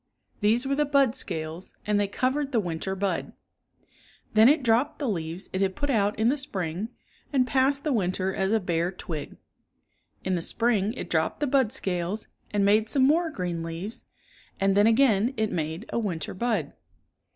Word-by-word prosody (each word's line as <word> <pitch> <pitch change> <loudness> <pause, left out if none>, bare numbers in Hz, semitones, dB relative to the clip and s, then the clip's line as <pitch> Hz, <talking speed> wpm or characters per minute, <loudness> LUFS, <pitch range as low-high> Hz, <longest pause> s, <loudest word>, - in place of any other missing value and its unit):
These 225 +5 +2
were 275 - 0
the 295 +2 +2
bud 275 -4 +3
scales 165 -7 -5
and 210 -1 +2
they 205 - +1
covered 270 +7 -1
the 240 - +2
winter 180 0 -3
bud. 195 0 -2 1.0
Then 220 +3 +7
it 295 -1 +3
dropped 240 +5 +2
the 285 - -2
leaves 170 -3 -2
It 190 - -1
had 190 -1 +1
put 285 -1 -1
out 210 -3 +1
In 220 - +2
the 285 +3 +1
spring 190 - -3 0.4
and 265 -3 +3
passe:l 275 +2 +2
the 300 - +1
winter 190 -3 0
as 190 +1 0
a 225 - +3
bare 175 -2 0
twig. 165 -5 -6 0.9
In 190 - -1
the 175 - 0
spring 220 +1 +1
it 255 - -6
dropped 160 -1 0
the 295 - +1
bud 265 -5 +2
scales, 190 -3 -3 0.2
and 205 -1 +1
made 215 +2 +3
some 265 +3 +2
more 330 +4 +3
green 180 - -3
leaves, 165 +6 -6 0.6
and 195 0 +2
then 205 +2 +5
again 230 0 +3
it 220 -1 0
made 160 +5 -3
a - - +1
winter 175 -9 -3
bud. 235 +4 -1
210 Hz, 185 wpm, -26 LUFS, 185-260 Hz, 1.0 s, Then